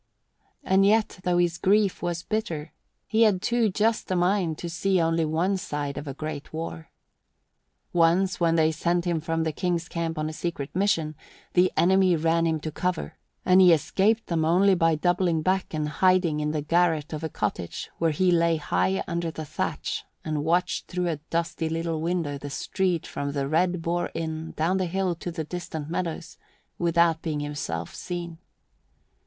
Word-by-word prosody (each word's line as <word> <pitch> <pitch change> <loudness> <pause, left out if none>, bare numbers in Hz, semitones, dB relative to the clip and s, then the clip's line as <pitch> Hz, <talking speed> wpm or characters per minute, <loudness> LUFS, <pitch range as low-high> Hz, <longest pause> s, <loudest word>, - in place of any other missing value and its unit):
And 190 -5 +3
yet, 215 -1 +2
though 180 -1 +1
his 175 -1 +1
grief 200 0 +2
was 175 -1 -2
bitter, 170 -8 -3 0.3
he 220 +1 +1
had 210 -5 +5
too 235 +2 +1
just 215 +3 0
a 185 - +1
mind 175 -2 +1
to 175 - -5
see 185 +3 +1
only 165 0 +2
one 170 +6 +1
side 145 -5 -4
of 145 - -6
a 135 - -5
great 155 -1 -6
war. 160 0 -6 1.0
Once, 175 +2 +3
when 165 -1 +3
they 160 -1 +3
sent 170 +3 0
him 170 -2 0
from 165 0 -1
the 160 - 0
King's 170 0 -1
camp 165 -1 -3
on 155 0 -1
a 155 - -5
secret 155 -4 -4
mission, 180 -6 +1 0.4
the 180 +1 +4
enemy 185 +2 +4
ran 165 +1 +2
him 160 -1 0
to 155 - -4
cover, 175 0 -3 0.3
and 185 +1 +6
he 180 -2 +8
escaped 200 +7 +2
them 165 -2 0
only 185 +5 +4
by 165 -3 +3
doubling 175 0 +1
back 190 +2 0
and 155 -1 -2
hiding 180 -1 +2
in 150 0 -1
the 150 -1 -2
garret 165 -1 +1
of 155 +1 -5
a 160 - -2
cottage 100 - -4
where 165 - +3
he 180 +4 +2
lay 170 -1 +3
high 95 - 0
under 170 0 -2
the 160 -1 -6
thatch - - -3 0.2
and 155 -2 -1
watched 175 +5 0
through 180 -1 -1
a 160 - -1
dusty 165 -1 -1
little 165 -1 -2
window 165 -4 -1
the 145 - -6
street 180 +4 -1
from 140 0 -4
the 140 -1 -1
Red 175 +3 +1
Boar 175 +1 -1
Inn 160 0 -4
down 170 +4 +1
the 185 -1 0
hill 190 +1 0
to 170 +1 -6
the 165 -1 -4
distant 160 -2 -6
meadows, 170 -1 -4 0.4
without 170 -1 +3
being 155 -3 -2
himself 85 - -4
seen. 170 -2 -6
170 Hz, 180 wpm, -26 LUFS, 155-180 Hz, 1.0 s, he